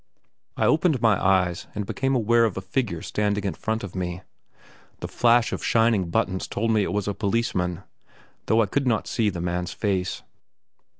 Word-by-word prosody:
I -, -, +2 dB
opened 155 Hz, -3 st, +3 dB
my 110 Hz, -3 st, +2 dB
eyes, 90 Hz, -2 st, +1 dB
and 105 Hz, -1 st, -3 dB
became 135 Hz, +6 st, -1 dB
aware 115 Hz, 0 st, +3 dB
of 110 Hz, -, -2 dB
a -, -, -2 dB
figure 95 Hz, -3 st, -2 dB
standing 105 Hz, -1 st, -1 dB
in 100 Hz, -, -1 dB
front 110 Hz, 0 st, -3 dB
of 100 Hz, -, -7 dB
me. 90 Hz, -1 st, -4 dB, 0.8 s
The -, -, -5 dB
flash 120 Hz, 0 st, +3 dB
of -, -, -4 dB
shining 115 Hz, -6 st, +2 dB
buttons 95 Hz, +2 st, -1 dB
told 115 Hz, +2 st, -1 dB
me 110 Hz, -1 st, +3 dB
it -, -, -1 dB
was 105 Hz, -1 st, -2 dB
a 100 Hz, -, 0 dB
policeman, 100 Hz, -5 st, -1 dB, 0.6 s
though 115 Hz, +1 st, +4 dB
I -, -, 0 dB
could 135 Hz, +6 st, -1 dB
not 110 Hz, -5 st, +1 dB
see 110 Hz, -2 st, 0 dB
the 90 Hz, -4 st, -5 dB
man's 90 Hz, 0 st, -2 dB
face. 95 Hz, -3 st, -2 dB
105 Hz, 185 wpm, -24 LUFS, 95-115 Hz, 0.8 s, though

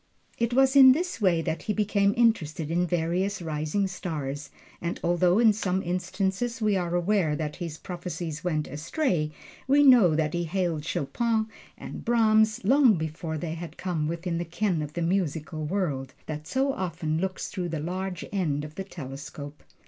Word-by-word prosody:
It 235 Hz, 0 st, +1 dB
was 265 Hz, +2 st, +4 dB
in 260 Hz, -2 st, +10 dB
this 340 Hz, -5 st, -3 dB
way 175 Hz, -5 st, +3 dB
that 160 Hz, 0 st, -2 dB
he 210 Hz, -, -1 dB
became 200 Hz, -1 st, +2 dB
interested 165 Hz, -10 st, +1 dB
in 175 Hz, +1 st, +1 dB
various 175 Hz, +4 st, 0 dB
rising 155 Hz, +4 st, -1 dB
stars, 155 Hz, -6 st, -4 dB, 0.3 s
and 170 Hz, 0 st, -3 dB
although 175 Hz, +2 st, +3 dB
in 225 Hz, -2 st, +6 dB
some 190 Hz, -2 st, -1 dB
instances 190 Hz, +6 st, -2 dB
we 215 Hz, -2 st, +2 dB
are 175 Hz, -2 st, -1 dB
aware 175 Hz, -3 st, +2 dB
that 150 Hz, -1 st, -4 dB
his 170 Hz, -4 st, -5 dB
prophecies 175 Hz, -3 st, -5 dB
went 155 Hz, -4 st, -1 dB
astray, 160 Hz, -, -1 dB, 0.4 s
we 285 Hz, +2 st, +5 dB
know 235 Hz, -, +7 dB
that 155 Hz, -1 st, 0 dB
he 175 Hz, 0 st, -1 dB
hailed 170 Hz, -3 st, -1 dB
Chopin 220 Hz, -, 0 dB, 0.3 s
and -, -, -8 dB
Brahms 220 Hz, -2 st, +3 dB
long 255 Hz, +1 st, +5 dB
before 160 Hz, 0 st, -4 dB
they 160 Hz, +1 st, -4 dB
had 170 Hz, 0 st, -8 dB
come 170 Hz, -5 st, -2 dB
within 170 Hz, +1 st, -2 dB
the -, -, -1 dB
ken 175 Hz, 0 st, -1 dB
of 150 Hz, 0 st, -5 dB
the 170 Hz, -, -2 dB
musical 160 Hz, -3 st, -1 dB
world, 150 Hz, -7 st, -2 dB
that 155 Hz, 0 st, -6 dB
so 270 Hz, +1 st, +1 dB
often 165 Hz, -5 st, -2 dB
looks 190 Hz, 0 st, -3 dB
through 180 Hz, -3 st, -3 dB
the 160 Hz, -2 st, -3 dB
large 180 Hz, +2 st, -4 dB
end 150 Hz, -7 st, 0 dB
of 150 Hz, -, -10 dB
the 195 Hz, -, -5 dB
telescope. 145 Hz, -3 st, -8 dB
175 Hz, 170 wpm, -27 LUFS, 155-205 Hz, 0.4 s, in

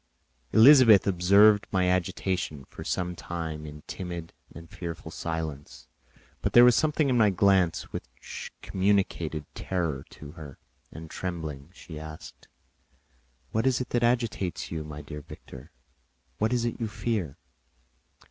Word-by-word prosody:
Elizabeth 115 Hz, -3 st, +8 dB
observed 100 Hz, +3 st, +5 dB
my 90 Hz, -1 st, +2 dB
agitation 90 Hz, -5 st, -1 dB
for -, -, -10 dB
some 90 Hz, -1 st, -2 dB
time 80 Hz, -3 st, -5 dB
in 75 Hz, 0 st, -10 dB
timid 85 Hz, -3 st, -6 dB, 0.2 s
and 85 Hz, 0 st, -11 dB
fearful 85 Hz, -2 st, -7 dB
silence, 80 Hz, -3 st, -5 dB, 0.5 s
but -, -, -1 dB
there 120 Hz, -, +9 dB
was 125 Hz, -2 st, +6 dB
something 155 Hz, -1 st, +2 dB
in 130 Hz, -, +2 dB
my 105 Hz, -2 st, +5 dB
glance 95 Hz, -3 st, +2 dB
which -, -, -8 dB
communicated 95 Hz, -6 st, 0 dB
terror 85 Hz, -7 st, -2 dB
to 75 Hz, -1 st, -11 dB
her, 75 Hz, -4 st, -11 dB, 0.3 s
and 80 Hz, 0 st, -10 dB
trembling, 80 Hz, -5 st, -5 dB
she 80 Hz, -4 st, -10 dB
asked, 80 Hz, 0 st, -11 dB, 1.0 s
"What 110 Hz, +4 st, +1 dB
is 130 Hz, -1 st, +2 dB
it 125 Hz, -, -4 dB
that 120 Hz, -, 0 dB
agitates 115 Hz, -7 st, -1 dB
you, 80 Hz, -2 st, -3 dB
my 75 Hz, -1 st, -8 dB
dear 75 Hz, 0 st, -8 dB
Victor? 65 Hz, -2 st, -12 dB, 0.7 s
What 110 Hz, +2 st, +1 dB
is 120 Hz, -1 st, +1 dB
it 120 Hz, -, -3 dB
you 115 Hz, -, -1 dB
fear?" 105 Hz, -, -3 dB
90 Hz, 140 wpm, -27 LUFS, 80-110 Hz, 1.0 s, there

